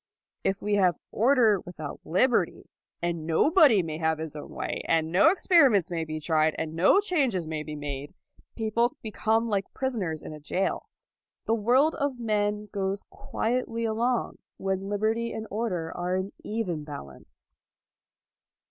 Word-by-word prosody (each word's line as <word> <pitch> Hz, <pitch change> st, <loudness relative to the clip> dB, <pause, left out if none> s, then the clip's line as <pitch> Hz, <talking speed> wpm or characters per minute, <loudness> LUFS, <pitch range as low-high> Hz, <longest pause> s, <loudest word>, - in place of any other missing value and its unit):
If 195 Hz, 0 st, -1 dB
we 210 Hz, 0 st, 0 dB
have 180 Hz, -4 st, +3 dB
order 230 Hz, -3 st, +4 dB
without 175 Hz, -4 st, -8 dB
liberty, 235 Hz, +9 st, +1 dB, 0.3 s
and 170 Hz, -2 st, -2 dB
nobody 265 Hz, -, +5 dB
may 155 Hz, -1 st, -5 dB
have 160 Hz, -1 st, +1 dB
his 160 Hz, -1 st, -6 dB
own 150 Hz, -, -8 dB
way, -, -, -4 dB
and 160 Hz, -1 st, +1 dB
no 190 Hz, -, +6 dB
experiments 275 Hz, -, +4 dB
may 165 Hz, -2 st, -2 dB
be 155 Hz, 0 st, -4 dB
tried, 155 Hz, 0 st, +2 dB
and 160 Hz, -1 st, -3 dB
no 180 Hz, -, +5 dB
changes 275 Hz, -, 0 dB
may 155 Hz, -1 st, -3 dB
be 150 Hz, 0 st, -6 dB
made, 145 Hz, +2 st, -6 dB, 0.4 s
people 230 Hz, +2 st, 0 dB
become 225 Hz, +1 st, 0 dB
like 200 Hz, -3 st, -1 dB
prisoners 205 Hz, -, -2 dB
in -, -, -7 dB
a 150 Hz, -, -9 dB
jail. 180 Hz, +6 st, -2 dB, 0.6 s
The 225 Hz, -, +1 dB
world 250 Hz, +8 st, +3 dB
of 280 Hz, -4 st, -2 dB
men 210 Hz, -2 st, 0 dB
goes 195 Hz, 0 st, -2 dB
quietly 230 Hz, 0 st, -2 dB
along 230 Hz, +2 st, -1 dB, 0.2 s
when 195 Hz, 0 st, -2 dB
liberty 220 Hz, +3 st, 0 dB
and 220 Hz, -, -5 dB
order 190 Hz, -7 st, -2 dB
are 180 Hz, +1 st, -1 dB
in 190 Hz, +2 st, -2 dB
even 190 Hz, -8 st, -3 dB
balance. 70 Hz, -, -11 dB
200 Hz, 150 wpm, -27 LUFS, 160-230 Hz, 0.6 s, no